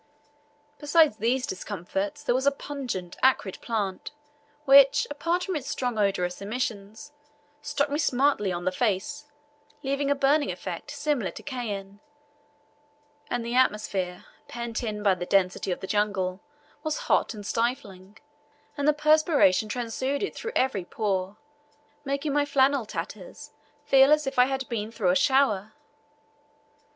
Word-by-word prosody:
Besides 300 -4 +4
these 250 +3 0
discomforts, 195 +1 -4
there - - +1
was 265 +2 0
a - - +6
pungent, 255 -11 -6
acrid 255 -7 +2
plant 205 -5 -3 0.6
which, 275 0 +7
apart 335 +5 -1
from 375 -2 -3
its 280 -3 -4
strong 245 -4 -2
odorous 185 -3 0
emissions, 220 +2 -4 0.5
struck 285 - 0
me 290 - 0
smartly 270 - +2
on 175 0 -4
the 185 - +2
face, 245 +9 -2 0.6
leaving 275 +1 -1
a 285 - +3
burning 285 +2 +2
effect - - -7
similar 275 -11 -1
to - - -10
cayenne; 205 -7 -5 1.3
and 240 -1 -2
the 235 - -3
atmosphere, 205 -7 0 0.2
pent 235 -1 -4
in 210 -3 -4
by 200 -2 +4
the 180 -1 -5
density 190 -1 +1
of 180 - -3
the - - -4
jungle, 190 -2 -1 0.4
was 310 -1 -2
hot - - +1
and 205 -1 -9
stifling, 215 -5 -3 0.6
and 285 0 -1
the 300 - +6
perspiration 300 - +3
transuded 260 - -2
through 455 +1 -6
every 255 -8 +1
pore, 195 0 -2 0.7
making 280 +1 -2
my 290 0 +3
flannel 275 -4 +2
tatters - - -7 0.3
feel 270 +1 +6
as 305 0 +4
if 270 -1 -2
I 250 - +7
had 265 0 -3
been 220 -2 -4
through 210 -6 +1
a - - +1
shower. 220 -2 +2
240 Hz, 140 wpm, -26 LUFS, 200-280 Hz, 1.3 s, which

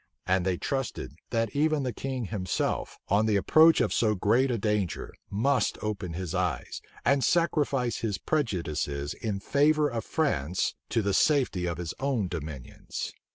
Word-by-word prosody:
And 95 0 +1
they 90 -2 +1
trusted, 130 - -3 0.2
that 115 -1 -1
even 155 0 +2
the 125 -2 -2
king 130 -3 -3
himself, 95 -3 -2
on 105 +3 +3
the 105 - +2
approach 160 +11 +6
of - - +1
so 110 -2 +2
great 115 +8 +3
a 120 - 0
danger, 100 -7 -1 0.2
must 125 +7 +1
open 100 -5 -3
his 90 -1 -4
eyes, 90 -8 -2 0.2
and 140 0 +3
sacrifice 140 -6 +1
his 105 -4 -2
prejudices 80 - -1
in 105 -4 -3
favor 150 +6 +3
of 115 -4 -3
France 95 - 0 0.2
to 115 - +1
the 100 0 0
safety 125 - +2
of 85 -2 -2
his 85 -2 -4
own 130 -7 0
dominions. 75 -7 -6
105 Hz, 155 wpm, -28 LUFS, 90-135 Hz, 0.2 s, approach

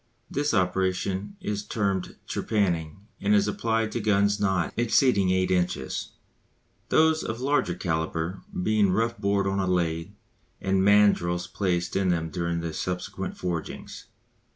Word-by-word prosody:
This 145 +1 0
operation 95 - 0
is 105 - -3
termed 100 -4 -2
"trepanning," 90 -5 -1 0.2
and 105 +1 +3
is 100 0 +3
applied 110 +1 0
to - - -2
guns 100 -1 +2
not 95 -4 0
exceeding 115 -4 +3
eight 95 0 +2
inches; 90 -7 -1 0.8
those 160 0 +4
of 110 +1 -4
larger 130 -9 +1
calibre 80 +1 -2 0.2
being 105 -1 +3
rough 115 +5 0
bored 100 0 +1
on 95 0 0
a 95 - 0
lathe, 85 -1 0 0.5
and 95 0 +1
mandrils 100 -4 +4
placed 90 -2 -1
in 95 -1 +2
them 80 -2 0
during 85 -1 -2
the 85 -1 -4
subsequent 90 +3 -4
forgings. 85 -3 -5
95 Hz, 135 wpm, -26 LUFS, 90-105 Hz, 0.8 s, those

